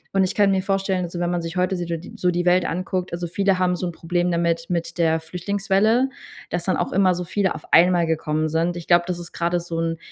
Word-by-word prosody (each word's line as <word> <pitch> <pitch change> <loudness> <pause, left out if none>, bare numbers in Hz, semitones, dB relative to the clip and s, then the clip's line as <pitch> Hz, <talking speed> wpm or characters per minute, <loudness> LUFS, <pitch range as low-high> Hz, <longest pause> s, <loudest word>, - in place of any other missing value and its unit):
und 195 - +4
ich 185 - -1
kann 200 -1 +4
mir 190 -1 +1
vorstellen, 195 -1 0
also 175 0 -6
wenn 175 0 0
man 175 -1 -1
sich 165 +2 -6
heute 185 +1 +1
so 175 - -3
di 170 0 -5
so 180 - +1
die 175 0 0
Welt 180 +1 +4
anguckt 185 +1 -2
also 175 0 -3
viele 190 +2 +1
haben 180 -1 +1
so 180 +1 -3
'n - - -3
Problem 175 +2 -1
damit 170 0 0
mit 170 0 -3
der 160 -1 +3
Flüchtlingswelle, 200 +8 +1 0.4
dass 175 -1 -2
dann 185 - +1
auch - - -2
immer 185 -1 +3
so 180 - -3
viele 190 +1 -1
auf - - -9
einmal 175 0 +5
gekommen 155 -1 -1
sind. 165 +3 0
Ich 170 - -7
glaube, 175 0 +4
das 180 -1 -2
ist 175 0 -9
grade 175 +1 0
so 170 -1 -5
'n 165 0 -1
175 Hz, 255 wpm, -22 LUFS, 170-185 Hz, 0.4 s, einmal